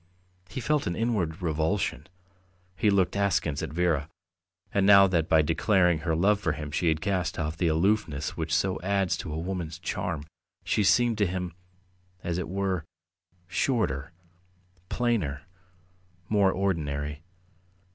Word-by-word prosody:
He 90 - -5
felt 150 +4 0
an 85 - -1
inward 95 -8 -1
revulsion; 80 +4 -1 0.7
he 105 - +2
looked 100 -2 +2
askance 95 -7 0
at - - -4
Vera, 80 -3 0 0.6
and 100 - +2
now 100 0 +8
that 85 -4 0
by 80 -1 +5
declaring 90 +1 +2
her 80 0 -1
love 100 +5 +3
for 85 -7 0
him 75 -1 -6
she 85 - 0
had 80 -1 +1
cast 95 -4 -1
off 80 0 -2
the 85 +2 0
aloofness 80 -2 0
which 80 -1 -4
so 95 +4 +1
adds 95 0 +1
to - - -6
a 75 - -3
woman's 85 -2 -4
charm, 85 -2 -3 0.4
she 105 - +1
seemed 115 +2 +3
to 105 - +3
him, 90 -1 -3 0.7
as 85 0 -2
it 90 - -4
were, 95 -3 -1 0.6
shorter, 90 - 0 0.8
plainer, 100 - -1 0.9
more 100 -3 +4
ordinary. 75 -6 -2
90 Hz, 145 wpm, -27 LUFS, 80-100 Hz, 0.9 s, now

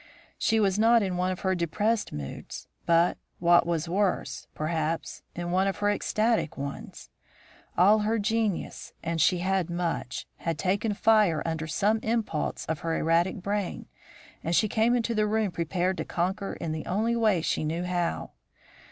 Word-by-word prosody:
She 225 0 +2
was 200 -1 +2
not 230 0 +5
in 185 -2 -1
one 180 +1 0
of 185 - -5
her 190 -1 +1
depressed 205 +6 0
moods, 70 -2 -7 0.2
but, 170 +1 +3 0.2
what 175 0 +4
was 165 -1 -1
worse, 190 +2 -1
perhaps, 160 +1 -2
in 175 0 -3
one 190 +2 +2
of 195 - -1
her 205 0 +2
ecstatic 215 -4 0
ones. 140 0 -7 0.7
All 205 +5 +6
her 215 +2 +1
genius, 220 -2 -1
and 165 -1 -1
she 180 - +4
had 190 -2 +1
much, 170 -7 -3
had 165 -2 -3
taken 200 +5 0
fire 210 -8 +3
under 160 -1 -2
some 205 +7 +1
impulse 220 -8 -2
of 160 -1 -2
her 165 -1 -1
erratic 170 +3 +1
brain, 200 -2 -2 0.6
and 165 +2 0
she 215 - +4
came 225 +3 +2
into 235 -1 0
the 215 -1 +2
room 215 -2 +1
prepared 175 +2 -1
to - - -2
conquer 190 +3 -2
in 165 - -4
the 155 0 -4
only 220 +5 +1
way 215 -8 +2
she - - 0
knew 165 +3 -2
how. 175 - -2
185 Hz, 170 wpm, -27 LUFS, 165-215 Hz, 0.7 s, All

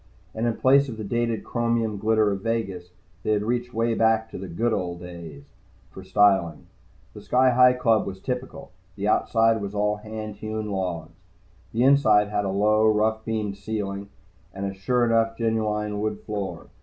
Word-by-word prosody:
And 115 +2 -1
in 115 - -1
place 140 +1 +4
of 115 - -7
the 110 - -5
dated 115 +1 -1
chromium 115 -3 -1
glitter 110 0 +2
of 100 -1 -3
Vegas, 100 -6 -3 0.3
they 110 - 0
had 105 -1 0
reached 120 +2 -2
way 115 0 0
back 110 0 +2
to - - -7
the 95 - -6
"Good 110 +7 -1
old 85 -3 -3
days" 85 -5 -10 0.5
for 95 - -10
styling. 95 -4 +2 0.5
The - - -10
Sky 130 0 +3
Hi 125 +1 +6
Club 115 -3 +2
was 95 0 -6
typical. 130 +2 -5 0.2
The 100 0 -3
outside 115 0 +2
was 100 0 -5
all 105 0 +1
hand 110 0 -7
hewn 110 -1 -4
logs. 90 -4 -3 0.6
The 115 +2 +1
inside 110 -7 +4
had 105 -1 -1
a - - -1
low, 105 +3 +3
rough 110 +1 +1
beamed 105 -3 -3
ceiling, 100 -1 -4 0.5
and 100 +1 -4
a 95 - -3
sure 120 +6 +1
enough 115 -1 +1
genuine 105 -2 -1
wood 110 +1 -3
floor. 100 -3 -5
110 Hz, 180 wpm, -25 LUFS, 100-115 Hz, 0.6 s, Hi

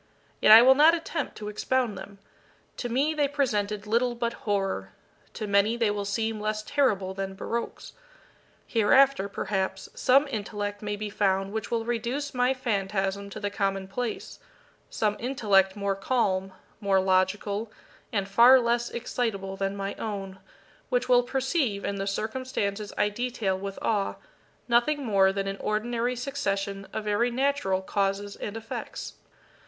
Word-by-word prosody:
Yet - - +6
I 225 +2 +11
will 260 +1 +8
not 310 +5 +6
attempt 330 0 -4
to 210 - -7
expound 230 +1 0
them. 200 +1 -10 0.6
To 245 - -3
me 275 +6 +1
they 295 -2 +1
presented 210 -8 -1
little 240 +3 +1
but 235 0 -2 0.2
horror 195 - -1 0.4
to 215 - -4
many 205 +3 +2
they 230 -3 +2
will 205 -1 -3
seem 220 +2 -1
less 215 0 -2
terrible 210 -9 +1
than 195 0 -4
baroques. 235 +4 -5 0.7
Hereafter, 235 -1 +4
perhaps, 195 -1 -3
some 275 +3 +4
intellect 205 -2 -4
may 210 -1 -3
be 210 0 -5
found 195 -1 0
which 220 - -3
will 230 -1 -1
reduce 240 +5 -2
my 250 0 +2
phantasm 200 -5 -1
to - - -7
the 205 -1 -3
commonplace 195 +3 -3 0.5
some 210 -1 0
intellect 205 -7 +2
more 200 -1 -1
calm, 195 -3 0 0.3
more 200 -2 +2
logical, 195 +3 0 0.4
and 200 -3 -1
far 235 +6 +7
less 235 0 0
excitable 215 -5 -3
than 195 +1 -2
my 195 0 -3
own, 195 -3 -5 0.5
which - - 0
will 245 -1 +6
perceive, 265 - -1
in 200 - -2
the 195 0 -3
circumstances 215 -1 -3
I 210 - +3
detail 230 -3 -2
with 195 +1 -6
awe, 205 -3 0 0.5
nothing 255 +4 +2
more 195 -3 +4
than 195 0 -2
an 195 0 -3
ordinary 235 +4 -1
succession 200 -7 -3
of 220 - -4
very 210 +3 +1
natural 250 -7 0
causes 200 +1 -1
and 210 +2 -6
effects. 225 0 -6
210 Hz, 150 wpm, -27 LUFS, 195-245 Hz, 0.7 s, I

